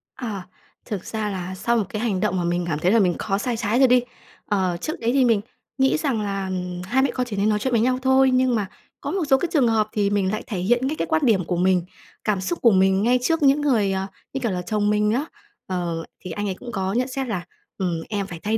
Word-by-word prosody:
À, 205 Hz, -7 st, -5 dB, 0.4 s
thực 200 Hz, -4 st, -5 dB
ra 220 Hz, -1 st, -3 dB
là 185 Hz, -1 st, -4 dB
sau 235 Hz, +5 st, +1 dB
một 215 Hz, -, +2 dB
cái 210 Hz, -, -4 dB
hành 215 Hz, -6 st, 0 dB
động 200 Hz, -2 st, 0 dB
mà 175 Hz, -, 0 dB
mình 175 Hz, 0 st, 0 dB
cảm 150 Hz, -3 st, -1 dB
thấy 180 Hz, +4 st, +2 dB
là 230 Hz, -, +5 dB
mình 180 Hz, -4 st, +2 dB
có 195 Hz, -2 st, 0 dB
sai 235 Hz, +2 st, -2 dB
trái 225 Hz, +1 st, 0 dB
rồi 265 Hz, -, +7 dB
đi. 250 Hz, 0 st, +5 dB, 0.4 s
Ờ, 185 Hz, -4 st, 0 dB
trước 310 Hz, -, -4 dB
đấy 235 Hz, 0 st, +1 dB
thì 265 Hz, -2 st, +4 dB
mình 225 Hz, -4 st, +3 dB, 0.4 s
nghĩ 265 Hz, +2 st, +3 dB
rằng 275 Hz, -8 st, -1 dB
là, 195 Hz, -1 st, -2 dB
ừm, 180 Hz, -1 st, -4 dB
hai 250 Hz, +8 st, +1 dB
mẹ 275 Hz, -, +2 dB
con 250 Hz, -, -1 dB
chỉ 210 Hz, -, -4 dB
nên 200 Hz, +2 st, +2 dB
nói 210 Hz, -1 st, +1 dB
chuyện 260 Hz, +4 st, -1 dB
với 230 Hz, -, +3 dB
nhau 255 Hz, +2 st, +2 dB
thôi, 265 Hz, 0 st, +4 dB
nhưng 255 Hz, -1 st, +3 dB
mà 210 Hz, -3 st, -1 dB, 0.3 s
có -, -, -3 dB
một 380 Hz, -3 st, 0 dB
số 270 Hz, -, +6 dB
cái 335 Hz, -, -2 dB
trường 275 Hz, -6 st, +4 dB
hợp 220 Hz, -2 st, +2 dB
thì 205 Hz, -2 st, +1 dB
mình 200 Hz, -2 st, +1 dB
lại 215 Hz, -, -3 dB
thể 205 Hz, -6 st, -3 dB
hiện 240 Hz, +7 st, +2 dB
ngay 305 Hz, -, -1 dB
cái -, -, -1 dB
quan 320 Hz, -1 st, +1 dB
điểm 200 Hz, -7 st, +3 dB
của 180 Hz, -, -1 dB
mình, 180 Hz, -1 st, +2 dB, 0.4 s
cảm 205 Hz, -3 st, 0 dB
xúc 340 Hz, -, -2 dB
của 235 Hz, -, +6 dB
mình 190 Hz, +1 st, +3 dB
ngay 250 Hz, +2 st, +3 dB
trước 325 Hz, +3 st, +1 dB
những 280 Hz, +1 st, +5 dB
người, 230 Hz, -9 st, +2 dB
ờ, 190 Hz, 0 st, -2 dB, 0.3 s
như 270 Hz, -, -2 dB
kiểu 235 Hz, -5 st, -1 dB
là 180 Hz, -, -2 dB
chồng 205 Hz, +3 st, 0 dB
mình 210 Hz, 0 st, +2 dB
á. 260 Hz, +7 st, 0 dB, 0.4 s
Ờ, 175 Hz, -3 st, -2 dB, 0.2 s
thì 185 Hz, -, -8 dB
anh 205 Hz, +5 st, -3 dB
ấy 190 Hz, -, -2 dB
cũng 245 Hz, -1 st, -8 dB
có 190 Hz, -2 st, -2 dB
nhận 250 Hz, +3 st, +1 dB
xét 265 Hz, 0 st, -3 dB
là 185 Hz, -6 st, -3 dB, 0.3 s
"Ừm, 175 Hz, -3 st, -1 dB
em 200 Hz, -2 st, -2 dB
phải 170 Hz, -3 st, -8 dB
thay 220 Hz, +2 st, +1 dB
210 Hz, 280 wpm, -23 LUFS, 190-250 Hz, 0.4 s, rồi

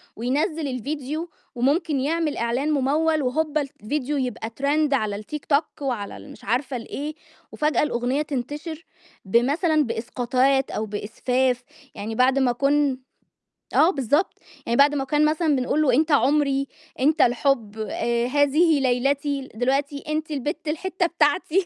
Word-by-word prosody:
وينزِّل 285 Hz, +6 st, -1 dB
الفيديو، 285 Hz, +5 st, -4 dB, 0.3 s
وممكن 285 Hz, +4 st, +1 dB
يعمل 310 Hz, +2 st, 0 dB
إعلان 240 Hz, +6 st, 0 dB
مموّل 300 Hz, +3 st, +2 dB
وهوبا 305 Hz, +4 st, 0 dB
الفيديو 280 Hz, +2 st, -3 dB
يبقى 250 Hz, -4 st, -3 dB
trend 290 Hz, +1 st, +2 dB
على 215 Hz, -6 st, 0 dB
التيك 245 Hz, +9 st, -7 dB
توك 295 Hz, +1 st, 0 dB
وعلى 240 Hz, -7 st, -3 dB
المش -, -, -13 dB
عارفة 255 Hz, +4 st, -1 dB
الإيه، 285 Hz, +6 st, -5 dB, 0.4 s
وفجأة 300 Hz, 0 st, +1 dB
الأغنية 255 Hz, 0 st, 0 dB
تنتشر 300 Hz, +4 st, -5 dB, 0.4 s
بمثلًا 290 Hz, -, +2 dB
بإسقاطات 255 Hz, +3 st, 0 dB
أو 215 Hz, -, -2 dB
بإسفاف، 245 Hz, +4 st, -1 dB, 0.3 s
يعني 220 Hz, +2 st, -5 dB
بعد 255 Hz, +3 st, +3 dB
ما 260 Hz, -2 st, +3 dB
كن 275 Hz, +2 st, +1 dB, 0.8 s
آه 325 Hz, -, +6 dB
بالضبط، 285 Hz, -, 0 dB, 0.3 s
يعني 235 Hz, -, 0 dB
بعد 285 Hz, +1 st, +5 dB
ما 275 Hz, -, 0 dB
كان 295 Hz, +3 st, +2 dB
مثلًا 310 Hz, -1 st, +2 dB
بنقول 260 Hz, +4 st, 0 dB
له: 265 Hz, -5 st, +3 dB
"أنت 310 Hz, +4 st, +2 dB
عمري، 275 Hz, 0 st, +2 dB, 0.3 s
أنت 305 Hz, +4 st, +3 dB
الحب، 240 Hz, -3 st, +1 dB
آآ، 235 Hz, +2 st, -1 dB
هذه 290 Hz, +3 st, +3 dB
ليلتي" 275 Hz, +2 st, 0 dB
دلوقتي: 275 Hz, +4 st, 0 dB
"أنت 310 Hz, 0 st, -2 dB
البت 295 Hz, +3 st, -3 dB
الحتة 350 Hz, +4 st, -1 dB
بتاعتي" 340 Hz, +3 st, +1 dB
280 Hz, 135 wpm, -24 LUFS, 250-300 Hz, 0.8 s, آه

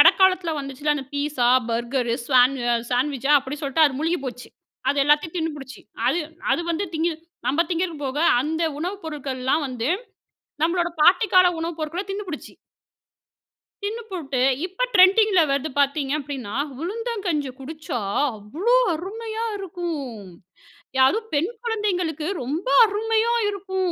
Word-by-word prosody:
இடைக்காலத்துல 370 Hz, -3 st, +5 dB
வந்துச்சுல்ல 280 Hz, +2 st, -1 dB
அந்த 275 Hz, -2 st, -4 dB
pizza, 285 Hz, -4 st, 0 dB, 0.2 s
burger, 235 Hz, +1 st, -1 dB
சாணு 255 Hz, -1 st, +4 dB, 0.3 s
சாண்ட்விச்சா 270 Hz, +2 st, +1 dB
அப்படி 270 Hz, +2 st, -6 dB
சொல்லிட்டு 285 Hz, +3 st, +3 dB
அது 265 Hz, -2 st, -3 dB
முழுகி 330 Hz, +3 st, 0 dB
போச்சு. 250 Hz, -1 st, -6 dB, 0.4 s
அது 285 Hz, -, +1 dB
எல்லாத்தையும் 300 Hz, +4 st, +2 dB
தின்னுபுடிச்சு. 295 Hz, -5 st, -5 dB, 0.3 s
அது 275 Hz, +7 st, +2 dB, 0.3 s
அது -, -, +1 dB
வந்து 335 Hz, +4 st, -1 dB
திங்கி 330 Hz, +2 st, +1 dB, 0.4 s
நம்ம 290 Hz, +6 st, +2 dB
திங்கிறக்கு 335 Hz, -3 st, -2 dB
போக, 265 Hz, +2 st, -3 dB, 0.2 s
அந்த 315 Hz, +5 st, -1 dB, 0.2 s
உணவு 360 Hz, +5 st, -3 dB
பொருட்கள்லாம் 280 Hz, -1 st, -2 dB
வந்து, 245 Hz, -1 st, -3 dB, 0.8 s
நம்பளோட 345 Hz, +1 st, +1 dB
பாட்டி 360 Hz, +7 st, +6 dB
கால 365 Hz, -1 st, +7 dB
உணவு 335 Hz, +1 st, -3 dB
பொருட்களை 320 Hz, +5 st, -3 dB
தின்னுபுடிச்சு. 390 Hz, -5 st, -6 dB, 1.3 s
தின்னு 445 Hz, +3 st, -3 dB
போட்டு 285 Hz, -9 st, -3 dB, 0.2 s
இப்போ 375 Hz, +6 st, -4 dB
ட்ரெண்டிங்கில 385 Hz, 0 st, +6 dB
வருது 280 Hz, +2 st, 0 dB
பாத்தீங்க 280 Hz, 0 st, +1 dB
அப்படின்னா, 265 Hz, -7 st, -6 dB, 0.3 s
உளுந்தங்கஞ்சி 385 Hz, -, -2 dB
குடிச்சா 300 Hz, -3 st, -5 dB, 0.4 s
அவ்வளோ 310 Hz, -, 0 dB, 0.2 s
அருமையா 440 Hz, +6 st, -5 dB
இருக்கும், 335 Hz, -, -5 dB, 0.8 s
யாரும் 425 Hz, +13 st, +3 dB
பெண் 305 Hz, +6 st, +1 dB
குழந்தைங்களுக்கு 365 Hz, -9 st, -1 dB, 0.2 s
ரொம்ப 300 Hz, -, -3 dB, 0.2 s
அருமையா 445 Hz, +2 st, +1 dB, 0.2 s
இருக்கு, 390 Hz, -1 st, -5 dB
315 Hz, 125 wpm, -23 LUFS, 275-370 Hz, 1.3 s, கால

